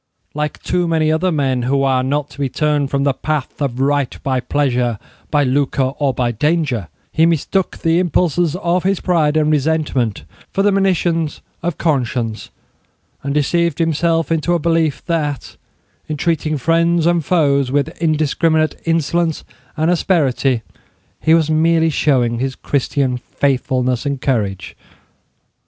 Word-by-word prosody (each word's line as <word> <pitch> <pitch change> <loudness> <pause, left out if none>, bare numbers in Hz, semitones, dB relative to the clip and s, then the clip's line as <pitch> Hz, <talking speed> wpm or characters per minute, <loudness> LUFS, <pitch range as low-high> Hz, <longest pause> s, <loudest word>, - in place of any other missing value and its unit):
Like 150 0 -3
too 180 -1 0
many 160 -2 +2
other 170 +4 +1
men, 135 -5 0
who 135 +3 +1
are 130 -1 +2
not 145 +2 -2
to - - -14
be 140 -2 0
turned 150 0 0
from 140 0 0
the 140 -1 +2
path 150 +1 -3
of 130 -3 -2
right 140 -1 0
by 130 -2 0
pleasure, 125 -4 0 0.3
by 145 -1 +2
lucre 135 0 0
or 140 -2 +2
by 125 -2 -1
danger, 145 - 0 0.2
he 160 +1 +3
mistook 170 +3 0
the 165 0 +1
impulses 175 -2 +1
of 180 -1 0
his 195 0 +1
pride 155 -4 +1
and 155 0 +2
resentment 145 - 0 0.3
for 195 - 0
the 205 - +4
monitions 175 -5 0 0.2
of 175 -2 -2
conscience, 120 -7 -1 0.7
and 140 +1 -3
deceived 170 +2 +1
himself 165 0 +1
into 165 +2 +1
a - - +3
belief 165 -3 0
that, 150 -5 -2 0.5
in 155 - -2
treating 155 -1 0
friends 165 +3 +2
and 170 -1 +2
foes 140 -6 +2
with 145 +2 +1
indiscriminate 155 0 +1
insolence 165 0 0 0.3
and 160 +3 +2
asperity, 135 - +1 0.6
he 160 - +4
was 160 -2 +2
merely 160 +1 +3
showing 125 -6 +1
his 130 +1 -2
Christian 135 -2 -1
faithfulness 130 -1 -1
and 140 -1 -2
courage. 100 -9 -2
150 Hz, 145 wpm, -18 LUFS, 135-165 Hz, 0.7 s, the